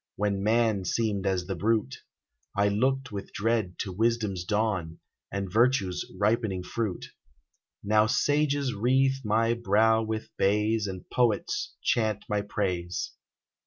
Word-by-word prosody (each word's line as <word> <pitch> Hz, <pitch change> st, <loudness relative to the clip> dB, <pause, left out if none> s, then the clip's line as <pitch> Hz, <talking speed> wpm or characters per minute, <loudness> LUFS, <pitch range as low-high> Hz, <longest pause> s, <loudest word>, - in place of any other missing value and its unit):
When 100 Hz, -1 st, 0 dB
man 110 Hz, -1 st, +2 dB
seemed 100 Hz, -1 st, -1 dB
as 95 Hz, -2 st, 0 dB
the 95 Hz, -, -3 dB
brute, 105 Hz, -5 st, 0 dB, 0.6 s
I 100 Hz, 0 st, +3 dB
looked 130 Hz, +5 st, 0 dB
with 100 Hz, -1 st, -6 dB
dread 110 Hz, -4 st, 0 dB
to 95 Hz, -, -4 dB
wisdom's 110 Hz, -3 st, 0 dB
dawn, 95 Hz, -5 st, -1 dB, 0.3 s
And 100 Hz, -1 st, -4 dB
virtue's 110 Hz, -6 st, +2 dB
ripening 105 Hz, -3 st, +1 dB
fruit: 105 Hz, -1 st, -3 dB, 0.8 s
Now 105 Hz, +1 st, +3 dB
sages 145 Hz, +1 st, +1 dB
wreathe 135 Hz, +5 st, +2 dB
my 115 Hz, +2 st, +2 dB
brow 110 Hz, 0 st, +3 dB
with 110 Hz, 0 st, -4 dB
bays, 105 Hz, +2 st, +2 dB
And 95 Hz, -2 st, -7 dB
poets 120 Hz, -5 st, 0 dB
chant 110 Hz, -3 st, +1 dB
my 105 Hz, -1 st, 0 dB
praise. 90 Hz, -4 st, -2 dB
105 Hz, 125 wpm, -28 LUFS, 100-115 Hz, 0.8 s, I